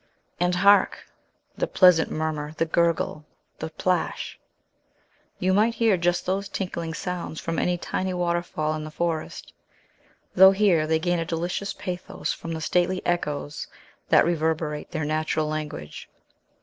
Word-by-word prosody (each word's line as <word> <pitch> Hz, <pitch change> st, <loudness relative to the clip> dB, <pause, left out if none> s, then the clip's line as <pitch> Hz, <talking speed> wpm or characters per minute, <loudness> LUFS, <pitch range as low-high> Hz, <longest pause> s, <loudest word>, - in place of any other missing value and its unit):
And 180 Hz, 0 st, +2 dB
hark, 200 Hz, +3 st, +4 dB, 0.5 s
the -, -, -1 dB
pleasant 180 Hz, -4 st, +5 dB
murmur, 155 Hz, -1 st, -3 dB
the 165 Hz, -, +2 dB
gurgle, 165 Hz, -2 st, 0 dB, 0.4 s
the -, -, -4 dB
plash! -, -, -2 dB, 1.0 s
You 185 Hz, +1 st, +1 dB
might 220 Hz, +4 st, +3 dB
hear 225 Hz, -4 st, +3 dB
just 175 Hz, 0 st, 0 dB
those 195 Hz, +2 st, -1 dB
tinkling 170 Hz, -4 st, -4 dB
sounds 180 Hz, -3 st, -4 dB
from 165 Hz, 0 st, -2 dB
any 180 Hz, 0 st, +1 dB
tiny 185 Hz, +2 st, -2 dB
waterfall 170 Hz, -3 st, -1 dB
in 155 Hz, 0 st, -4 dB
the 155 Hz, -, -6 dB
forest, 160 Hz, 0 st, -3 dB, 0.8 s
though 190 Hz, +1 st, +8 dB
here 190 Hz, -6 st, +3 dB
they 160 Hz, 0 st, +3 dB
gain 175 Hz, +1 st, 0 dB
a -, -, 0 dB
delicious 175 Hz, +4 st, -2 dB
pathos 180 Hz, -2 st, -4 dB
from 165 Hz, -, -6 dB
the 160 Hz, -, -4 dB
stately 180 Hz, +3 st, 0 dB
echoes 150 Hz, -4 st, -2 dB, 0.4 s
that -, -, +6 dB
reverberate 160 Hz, -2 st, -1 dB
their 155 Hz, -1 st, -3 dB
natural 155 Hz, +1 st, 0 dB
language. 150 Hz, -, -5 dB
170 Hz, 140 wpm, -25 LUFS, 155-180 Hz, 1.0 s, though